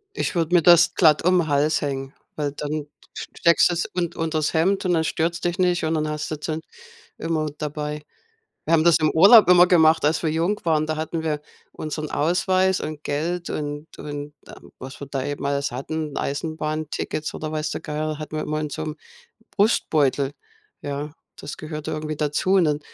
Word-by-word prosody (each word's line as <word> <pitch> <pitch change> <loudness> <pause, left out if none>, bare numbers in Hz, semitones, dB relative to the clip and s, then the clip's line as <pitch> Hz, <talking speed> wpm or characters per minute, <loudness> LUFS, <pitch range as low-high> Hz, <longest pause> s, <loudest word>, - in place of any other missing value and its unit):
Ich - - -2
würde 170 +1 0
mir 170 - +5
das 175 0 +6
glatt 155 -4 +4
um 180 0 +4
'n 165 - -2
Hals 145 +2 +2
hängen, 135 -2 -4 0.2
weil 145 -2 -2
dann 145 0 -5
d - - -18 0.3
sch - - -6
steckst 170 +1 +5
du's 175 0 -1
un 175 -2 -1
unters 160 -2 -1
Hemd 190 +5 +1
und 180 - +1
dann 160 -1 +1
stört's 170 +2 -1
dich 175 +2 -2
nicht 180 -2 +2
und 160 - 0
dann 155 -1 0
hast 150 0 -4
du 155 - -2
dann 155 +1 -4 0.6
immer 160 -2 -1
dabei. 150 0 -4 0.6
Wir 160 - -1
haben 160 -1 +4
das 170 -1 +5
im 155 -1 +2
Urlaub 200 +4 +7
immer 180 0 +7
gemacht, 160 -3 +4
als 155 - +1
wir 160 - +1
jung 170 +6 0
waren. 155 -2 +2
Da 155 0 -2
hatten 160 +1 -3
wir 150 -2 -2 0.3
unseren 155 0 -5
Ausweis 185 +4 +1
und 155 -1 -6
Geld 170 +4 -2
und 145 0 -4
und, 145 0 -6
ähm, - - -14
was 130 +1 -9
wir 140 - -6
da 135 -1 -3
eben 145 0 -4
alles 140 0 -1
hatten 150 +4 -4
Eisenbahntickets 155 +1 -3
oder 155 0 -5
weiß 155 0 -2
der - - -4
Geier, 155 0 -3
hatten 155 0 -6
wir 155 - -1
immer 155 0 -2
in 150 -1 -4
so 155 - -5
'm 155 0 -5 0.5
Brustbeutel, 145 - +1 0.5
ja. 145 +1 -5 0.2
Das - - -8
gehörte 155 -1 -6
irgendwie 155 0 -4
dazu. 150 +5 -1
Und 185 - +5
dann, 150 -1 0
155 Hz, 200 wpm, -23 LUFS, 150-170 Hz, 0.6 s, Urlaub